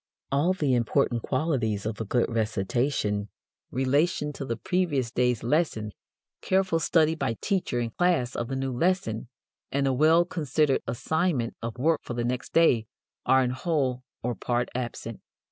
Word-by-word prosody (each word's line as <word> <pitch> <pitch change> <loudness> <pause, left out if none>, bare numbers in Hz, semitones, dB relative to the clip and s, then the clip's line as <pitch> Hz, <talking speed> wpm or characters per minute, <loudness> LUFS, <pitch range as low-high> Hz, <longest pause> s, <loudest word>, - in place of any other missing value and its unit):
All 150 +7 +3
the 150 -8 0
important 120 0 +1
qualities 125 -8 -1
of 110 0 -3
a - - -2
good 120 +4 +1
recitation, 110 -1 -1 0.4
relation 145 +4 +1
to 140 - -6
the 115 -3 -3
previous 170 -10 0
day's 125 -2 +1
lesson, 120 -6 0 0.5
careful 185 -3 +2
study 160 -1 +3
by 115 -8 -2
teacher 190 - -1
and 115 -2 -3
class 170 -9 +1
of 120 - -2
the 135 - -3
new 135 -1 -2
lesson, 125 - 0 0.4
and 140 0 +1
a 135 - +2
well 160 +5 +5
considered 150 -4 +1
assignment 130 +1 0
of 115 +1 -5
work 155 +4 +2
for 120 - -6
the 120 0 -1
next 125 +1 -3
day 125 -10 +4 0.4
are 130 0 +5
in 125 - 0
whole 130 -3 -1 0.2
or 120 +1 0
part 120 +1 -1
absent. 120 -2 -5
130 Hz, 160 wpm, -27 LUFS, 120-160 Hz, 0.5 s, well